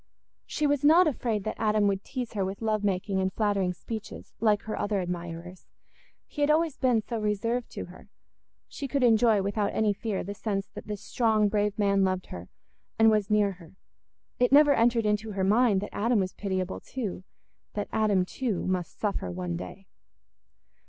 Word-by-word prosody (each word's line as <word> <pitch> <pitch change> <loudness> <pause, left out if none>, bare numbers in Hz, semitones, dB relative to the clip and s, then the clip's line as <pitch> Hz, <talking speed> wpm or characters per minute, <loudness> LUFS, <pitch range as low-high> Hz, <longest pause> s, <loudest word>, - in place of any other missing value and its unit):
She 305 - -1
was 290 -1 +1
not 325 +5 +7
afraid 235 - -1
that 215 - -5
Adam 215 -1 +2
would 195 -1 0
tease 250 -4 -5
her 200 -3 -1
with 195 +4 -4
love 215 -1 0
making 190 0 0
and 190 0 0
flattering 200 -3 0
speeches 215 +4 -8
like 210 -2 +2
her 220 - -4
other 205 -1 -1
admirers; 175 0 -6 0.6
he 295 - -7
had 290 - +3
always 315 -1 +2
been 245 -5 +2
so 230 +1 -4
reserved 220 +3 -1
to - - -5
her; - - -15 0.6
she 280 - -6
could 275 0 0
enjoy 225 -3 +4
without 200 +1 -1
any 215 -2 +2
fear 205 -1 -3
the 200 - -5
sense 200 -2 -2
that - - -10
this 210 -2 -5
strong 220 -3 +2
brave 210 0 0
man 200 -2 +2
loved 185 -1 0
her 90 0 -8 0.5
and 225 0 +6
was 210 -1 +1
near 210 -1 +3
her. 175 -1 -14 0.6
It 245 0 +3
never 290 +1 +7
entered 230 -2 +2
into 210 +1 0
her 195 -1 -1
mind 210 0 +3
that 205 - -7
Adam 230 +1 +2
was 185 -1 -3
pitiable 190 -2 -3
too—that 205 -2 -7
Adam 205 -4 +2
too 225 -1 -3
must 180 -2 -3
suffer 200 - -2
one 90 -1 -4
day. 90 - -8
210 Hz, 180 wpm, -28 LUFS, 190-230 Hz, 0.6 s, not